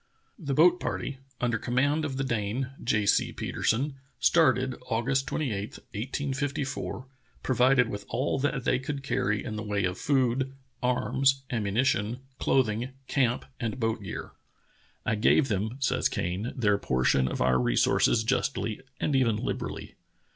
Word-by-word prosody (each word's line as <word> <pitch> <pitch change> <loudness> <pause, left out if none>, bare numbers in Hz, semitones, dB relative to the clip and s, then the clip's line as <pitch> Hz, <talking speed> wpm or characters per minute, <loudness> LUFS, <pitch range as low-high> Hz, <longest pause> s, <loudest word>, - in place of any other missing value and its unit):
* - - -35
The 135 - +1
boat 175 +4 +6
party, 135 -1 -3 0.2
under 120 -2 0
command 145 +6 +1
of 135 -3 -3
the 135 - 0
Dane, 120 +2 -2
J. 110 -4 +1
C. - - +3
Petersen, 135 +5 -1 0.2
started 130 -6 +4 0.2
August 135 +4 +1
28, 110 -9 -2 0.2
1854, 135 +3 -3 0.4
provided 125 -1 +4
with 100 -3 -6
all 130 +3 0
that 135 -2 0
they 125 - +2
could 135 +1 -4
carry 105 -6 0
in 110 - -4
the - - -3
way 105 -2 -1
of 90 +1 -2
food, 130 -1 +1 0.3
arms, 135 +2 +2
ammu 105 -5 -1
nition, 115 -1 +1 0.2
clothing, 125 0 +1
camp 125 -3 +1
and 120 +1 -3
boat 115 -1 0
gear. 95 - -6 0.7
"I - - +1
gave 125 +6 +3
them 110 +4 -1
[says 135 - +1
Kane] 95 +7 -2
their 105 -5 +2
portion 65 -1 +2
of - - -3
our 65 0 +3
resources 60 - +3
justlj', 110 -1 -1 0.2
and 145 - 0
even 125 -5 +3
liberally. 105 - -4
125 Hz, 145 wpm, -28 LUFS, 105-135 Hz, 0.7 s, boat